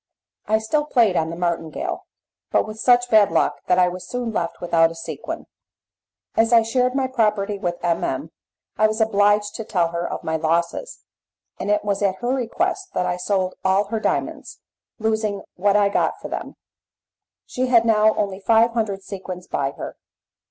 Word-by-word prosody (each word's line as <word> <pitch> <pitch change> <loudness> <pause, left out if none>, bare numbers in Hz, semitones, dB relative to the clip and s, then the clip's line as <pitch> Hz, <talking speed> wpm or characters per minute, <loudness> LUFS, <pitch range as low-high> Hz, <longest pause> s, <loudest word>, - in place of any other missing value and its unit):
I 220 - +3
still 295 +8 0
played 230 -10 +3
on 160 -1 +1
the 165 - -5
martingale, 170 -2 -3 0.4
but - - +2
with 215 0 -8
such 245 +1 +3
bad 215 -4 +6
luck 165 - +1
that 180 - +3
I 180 -1 +5
was 180 +1 -6
soon 245 -2 -3
left 170 -5 -2
without 165 -1 +3
a 165 - -9
sequin. 165 0 -6 0.9
As 225 +1 +3
I 230 -1 +6
shared 250 +2 +1
my 270 -1 +1
property 210 -5 0
with 175 -2 -2
M. 170 -1 +1
M. 140 +5 -3 0.5
I 215 - +6
was 215 +1 -3
obliged 205 -1 +3
to 225 - -4
tell 175 -5 0
her 170 +1 -3
of - - -5
my 160 0 -1
losses, 170 - -1 0.6
and - - -3
it 210 0 +1
was 200 -1 -1
at 195 -2 +2
her 245 +5 -2
request 360 - -2
that 180 - +1
I 180 0 -1
sold 185 0 -1
all 195 +2 +2
her 225 0 -1
diamonds, - - -2 0.4
losing 220 -2 -1
what 200 +2 +1
I 205 -1 +5
got 200 - 0
for - - -7
them; - - -5 0.9
she 255 0 -2
had 235 -2 +4
now 215 -1 +4
only 195 -2 -2
five 225 +3 +4
hundred 210 -4 -2
sequins 185 -2 -7
by 135 -1 -1
her. - - -8
205 Hz, 185 wpm, -22 LUFS, 180-225 Hz, 0.9 s, bad